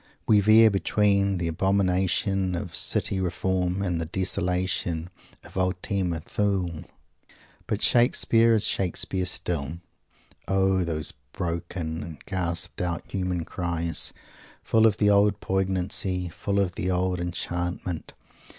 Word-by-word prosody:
We 105 - +5
veer 110 +2 +6
between 100 0 +2
the 85 -1 -1
abomination 95 +1 +1
of 90 -2 -5
city 95 - +1
reform 95 +1 -1
and 90 -4 -1
the 80 - -3
desolation 90 -1 -1 0.3
of - - -11
Ultima 90 -2 -1
Thule. 95 -4 -2 0.8
But - - -1
Shakespeare 115 -1 +4
is 105 - +1
Shakespeare 95 0 -1
still. 85 -4 -1 0.7
O 95 -1 +2
those 80 -3 -3 0.2
broken 85 -2 -4
and 80 -3 -9
gasped 85 -3 -2
out 85 -1 -3
human 90 -3 -2
cries, 85 -2 -1 0.5
full 110 0 +4
of 105 -2 +1
the 105 -1 +4
old 100 0 +3
poignancy, 95 -1 -1
full 100 +4 -2
of 95 -3 0
the 90 - -2
old 90 0 0
enchantment! 90 0 -4
90 Hz, 120 wpm, -26 LUFS, 85-100 Hz, 0.8 s, veer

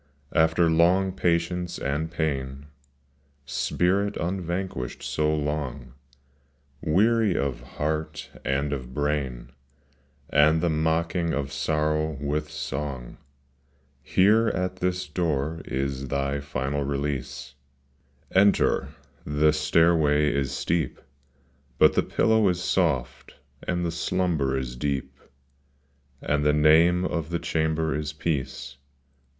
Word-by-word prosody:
After 80 +1 +3
long 90 +4 +3
patience 90 0 -1
and 75 +4 -2
pain, 70 -4 -3 0.8
Spirit 95 +9 0
unvanquished 90 -6 -3
so 75 0 0
long, 75 -4 -3 0.9
Weary 105 +4 +3
of 70 -3 -2
heart, 75 +4 -4
and 70 +2 0
of 65 -2 -6
brain 70 -4 -2 0.8
And 75 +2 +5
the 85 0 +1
mocking 80 +2 0
of 70 -1 -3
sorrow 75 +1 0
with 75 +1 -2
song, 70 -4 -5 0.4
— 70 0 -39
Here, 105 - +4
at 90 -2 -1
this 90 -2 -1
door 80 -1 -1
is 70 0 -3
thy 70 +1 -1
final 70 0 -2
release 70 -2 -3 0.4
:— 70 - -38
Enter, 100 - +2 0.4
the 75 +1 +2
stairway 75 -1 +3
is 70 -2 -1
steep 80 -5 -1 0.8
But - - +6
the - - +3
pillow 110 -3 +2
is 90 0 -1
soft, 75 -10 -1 0.3
and 90 0 0
the 85 - -1
slumber 80 -5 0
is 65 -2 -4
deep, 70 0 -3 1.0
And 75 0 +1
the 75 0 +3
name 80 +4 +5
of 85 -3 -2
the 85 - -1
chamber 80 -1 0
is 75 0 -3
peace. 70 -3 -3
75 Hz, 110 wpm, -26 LUFS, 70-85 Hz, 1.0 s, But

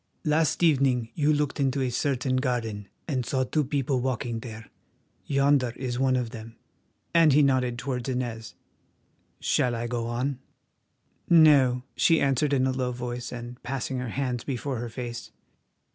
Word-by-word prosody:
"Last 155 +2 +2
evening 135 -7 +3
you 150 -1 +2
looked 150 -1 0
into 135 0 +1
a 125 - -1
certain 130 0 0
garden 115 -6 -2 0.2
and 130 -6 -1
saw 130 +2 0
two 150 +4 0
people 135 -2 -1
walking 120 -2 -2
there—yonder 125 +3 -2
is 125 -2 -3
one 130 -1 +3
of 120 -3 -1
them," 115 0 -9 0.6
and 165 -4 +6
he 150 +2 +5
nodded 130 -3 +1
towards 125 0 -3
Inez. 120 -3 -4 0.8
"Shall 120 -1 +1
I 115 +1 -3
go 120 -1 -2
on?" 125 +3 -2 0.9
"No," 140 -7 +6
she 165 -1 +4
answered 140 +1 +1
in 130 -2 +2
a 130 - +1
low 130 -1 -1
voice, 120 0 -5
and 120 0 -8
passing 130 0 -3
her 125 -1 -4
hands 125 -1 -2
before 135 -1 -3
her 120 0 -4
face. 120 0 -6
130 Hz, 155 wpm, -26 LUFS, 120-140 Hz, 0.9 s, and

